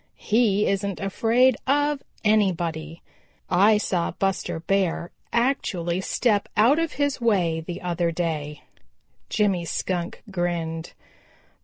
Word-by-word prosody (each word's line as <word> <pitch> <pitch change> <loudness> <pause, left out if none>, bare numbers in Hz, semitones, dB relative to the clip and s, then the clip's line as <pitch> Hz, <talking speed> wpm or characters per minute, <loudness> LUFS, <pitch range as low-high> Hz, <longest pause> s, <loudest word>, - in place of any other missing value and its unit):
He 210 -2 +2
isn't 200 -1 -1
afraid 230 +5 +2
of 290 +1 +2 0.2
anybody. 170 -6 0 0.5
I 205 +4 +5
saw 185 -4 0
Buster 195 -4 -2
Bear 175 -1 0 0.2
actually 190 -8 0
step 205 +1 +1
out 245 +9 +5
of 330 -2 -1
his 285 -3 -1
way 180 -8 +2
the 175 +2 -7
other 175 -1 0
day." 155 -3 -3 0.7
Jimmy 200 -5 +1
Skunk 175 +1 -3
grinned. 170 -3 -3
190 Hz, 110 wpm, -24 LUFS, 170-220 Hz, 0.7 s, I